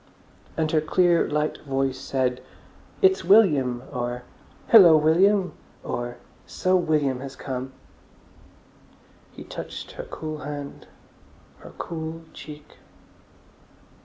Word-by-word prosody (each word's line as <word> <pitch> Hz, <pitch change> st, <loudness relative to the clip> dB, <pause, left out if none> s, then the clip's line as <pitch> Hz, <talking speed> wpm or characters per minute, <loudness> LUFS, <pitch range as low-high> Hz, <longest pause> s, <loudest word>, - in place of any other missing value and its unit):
And 160 Hz, -1 st, 0 dB
her 155 Hz, -, +3 dB
clear, 175 Hz, +2 st, +2 dB
light 150 Hz, +1 st, -1 dB
voice 135 Hz, -2 st, -2 dB
said, 130 Hz, -2 st, -1 dB, 0.6 s
"It's 385 Hz, 0 st, +4 dB
William," 140 Hz, -, +4 dB
or 120 Hz, 0 st, -3 dB, 0.5 s
"Hillo, 180 Hz, -8 st, +9 dB
William!" 185 Hz, +5 st, +3 dB, 0.3 s
or 120 Hz, 0 st, -4 dB, 0.3 s
"So 185 Hz, 0 st, 0 dB
William 150 Hz, -7 st, +1 dB
has 135 Hz, 0 st, -8 dB
come!" 130 Hz, -1 st, -5 dB, 1.6 s
He -, -, -11 dB
touched -, -, -8 dB
her -, -, -8 dB
cool 155 Hz, -1 st, -6 dB
hand, 145 Hz, -1 st, -7 dB, 0.7 s
her -, -, -13 dB
cool 160 Hz, 0 st, -5 dB
cheek. 150 Hz, -1 st, -12 dB
150 Hz, 105 wpm, -24 LUFS, 135-170 Hz, 1.6 s, Hillo